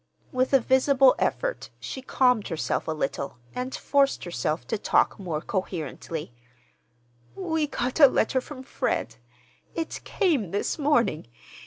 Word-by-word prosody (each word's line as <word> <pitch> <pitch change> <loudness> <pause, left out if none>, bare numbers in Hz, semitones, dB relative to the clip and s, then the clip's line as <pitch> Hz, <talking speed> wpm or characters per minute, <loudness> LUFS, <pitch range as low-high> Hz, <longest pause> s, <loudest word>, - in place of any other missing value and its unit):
With 255 0 +1
a 270 - +6
visible 260 +1 +5
effort - - -1
she 265 - -6
calmed 250 -4 +2
herself 165 -4 -2
a - - 0
little 140 -3 -3 0.2
and 250 +1 -4
forced 280 -1 +2
herself 155 -1 -2
to 225 - 0
talk - - +2
more 165 -6 -3
coherently. 160 - -4 1.0
"We 320 -5 -1
got 255 0 -2
a 285 - +10
letter 260 0 +1
from 260 -1 -9
Fred. 115 - -2 0.6
It 325 -1 -4
came 305 - +1
this 205 - -2
morning. 245 - +2
255 Hz, 135 wpm, -26 LUFS, 170-280 Hz, 1.0 s, a